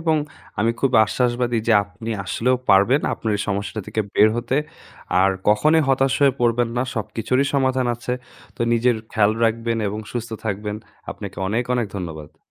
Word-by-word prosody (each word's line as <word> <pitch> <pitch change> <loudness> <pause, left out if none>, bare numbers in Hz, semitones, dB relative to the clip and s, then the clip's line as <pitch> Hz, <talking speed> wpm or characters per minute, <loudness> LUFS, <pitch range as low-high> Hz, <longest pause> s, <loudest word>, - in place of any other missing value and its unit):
এবং 160 -1 +2 0.4
আমি 115 +2 +3
খুব 135 - +2
আশ্বাসবাদী 120 +1 0
যে - - +5
আপনি 100 +4 -8
আসলেও 125 +7 +1
পারবেন 100 +8 +5
আপনার 110 - -2
এই 105 - -2
সমস্যাটা 100 +2 -2
থেকে 110 - -2
বের 110 - +6
হতে। 120 +2 -1 0.6
আর 95 +1 +4 0.2
কখনোই 155 +10 +4
হতাশ 135 0 +3
হয়ে 140 -1 +5
পড়বেন 120 0 +2
না। 120 - +2
সব 110 -4 -2
কিছুরই 130 +4 +1
সমাধান 130 -2 +2
আছে। 120 +1 -5 0.4
তো - - -22
নিজের 120 +1 +3 0.2
খেয়াল 105 -1 +3
রাখবেন 115 0 0
এবং 105 +2 -4
সুস্থ 120 -1 -4
থাকবেন। 105 0 -3 0.3
আপনাকে - - -8
অনেক, 115 +5 0
অনেক 120 -3 0
ধন্যবাদ। 80 -5 -7
115 Hz, 170 wpm, -22 LUFS, 105-125 Hz, 0.6 s, বের